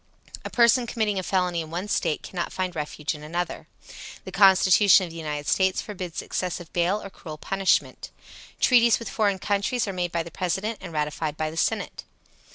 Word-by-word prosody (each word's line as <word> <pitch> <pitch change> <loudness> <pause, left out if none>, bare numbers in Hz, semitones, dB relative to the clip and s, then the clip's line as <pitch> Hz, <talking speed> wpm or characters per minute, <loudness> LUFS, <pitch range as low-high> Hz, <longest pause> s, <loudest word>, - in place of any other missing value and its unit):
A - - -5
person 235 0 +4
committing 215 -4 -1
a - - -1
felony 180 -2 0
in 160 - -8
one 175 +5 -4
State 160 -6 -1
cannot 175 -2 -4
find 185 -1 -3
refuge 150 0 -3
in 150 - -10
another. 170 +4 -4 0.6
The - - -7
Constitution 195 0 +6
of 170 - -10
the - - -11
United 150 -2 -4
States 190 +3 +2
forbids 185 -5 -5
excessive 175 -2 -4
bail 180 +4 +1
or 195 - -8
cruel 155 -5 -9
punishment. 195 +4 0 0.5
Treaties 235 -2 +5
with 230 - -8
foreign 205 -3 +1
countries 205 +4 -1
are 195 - -3
made 175 -1 -2
by 170 -1 -1
the 170 - -10
President 190 +6 -2
and 180 -2 -8
ratified 150 0 -2
by 155 0 -2
the - - -10
Senate. - - -1
185 Hz, 185 wpm, -25 LUFS, 165-200 Hz, 0.6 s, Constitution